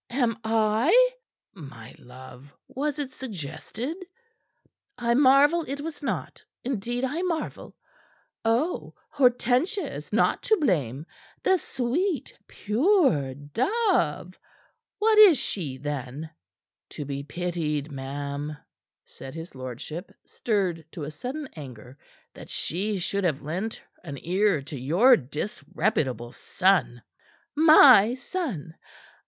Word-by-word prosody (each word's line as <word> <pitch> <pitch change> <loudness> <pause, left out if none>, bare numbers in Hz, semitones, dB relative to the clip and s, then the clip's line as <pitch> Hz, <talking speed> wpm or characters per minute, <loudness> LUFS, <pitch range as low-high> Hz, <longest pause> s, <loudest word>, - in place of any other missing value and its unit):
"Am 240 -3 0
I?" 225 - +3 0.4
"My 135 - -11
love! 130 +2 -13 0.2
Was 290 +2 -3
it 280 -3 -4
suggested?" 230 - -6 1.0
"I 235 -1 +1
marvel 285 +5 +5
it 275 +2 -4
was 310 +1 -6
not. 190 - -4 0.2
Indeed, 240 0 -3
I 295 +6 -2
marvel! 345 -3 -4 0.7
Oh, 240 +10 0 0.2
Hortensia 255 - +2
is - - -8
not - - +2
to 435 - +2
blame, 150 - 0 0.4
the 380 - +4
sweet, 295 - -2
pure 215 - +2
dove! 185 - 0 0.6
What 430 +1 +4
is 390 -8 +9
she, 165 - -3
then?" 145 +2 -5 0.6
"To 145 - -7
be 140 0 -4
pitied, 155 -1 -3
ma'am," 140 +2 -5 0.5
said 135 +2 -11
his 165 +2 -8
lordship, 130 - -7
stirred 190 -7 -1
to 150 -4 -5
sudden 265 - -6
anger, 130 -5 -10 0.4
"that - - -12
she 200 +5 -2
should 200 +2 -2
have 155 -6 0
lent 185 +9 -4 0.2
an 140 -5 -7
ear 185 -3 +2
to 145 -1 -7
your 180 - +5
disreputable 145 - -2
son." 185 -11 +1 0.5
"My 280 -8 +8
son? 255 - -5
195 Hz, 110 wpm, -26 LUFS, -, 1.0 s, is